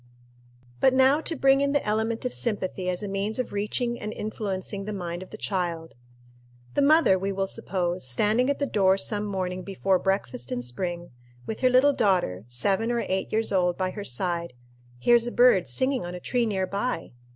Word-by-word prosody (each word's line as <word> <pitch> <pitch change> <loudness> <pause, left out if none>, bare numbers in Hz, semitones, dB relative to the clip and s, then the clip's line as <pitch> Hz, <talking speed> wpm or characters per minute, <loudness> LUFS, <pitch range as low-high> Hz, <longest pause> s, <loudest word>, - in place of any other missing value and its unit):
But 260 - +4
now 265 +3 +4
to 325 - -3
bring 270 0 +4
in 280 0 +1
the 285 - +1
element 220 +3 -1
of 250 - -2
sympathy 190 -5 -1
as 180 +3 -2
a - - -3
means 200 +2 -2
of 255 -4 -3
reaching 235 +4 -2
and 210 - -5
influencing 200 -2 -4
the 210 - -4
mind 175 -2 -5
of 185 - -10
the 215 - -9
child: 170 -6 -3 0.8
The - - +1
mother, 285 - +5
we 195 +1 -2
will 195 0 -1
suppose, 180 -2 -3
standing 215 - +2
at 285 - +1
the 285 - 0
door 195 -6 +3
some 210 +1 0
morning 185 -2 -3
before 195 0 0
breakfast 190 - -2
in 125 -1 -2
spring, 175 +7 -4 0.3
with 220 - -5
her 255 - +4
little 260 +3 +5
daughter, 180 - +1
seven 195 - +1
or 235 -1 -1
eight 190 0 -2
years 220 +1 +1
old, 180 -2 +1
by 185 -1 -1
her 205 +1 -6
side, 170 +2 -1 0.4
hears 235 - +4
a - - -3
bird 240 - +4
singing 260 - 0
on 175 +1 -6
a - - -6
tree 240 +5 0
near 190 -3 0
by. 200 -1 -3
200 Hz, 195 wpm, -26 LUFS, 180-235 Hz, 0.8 s, mother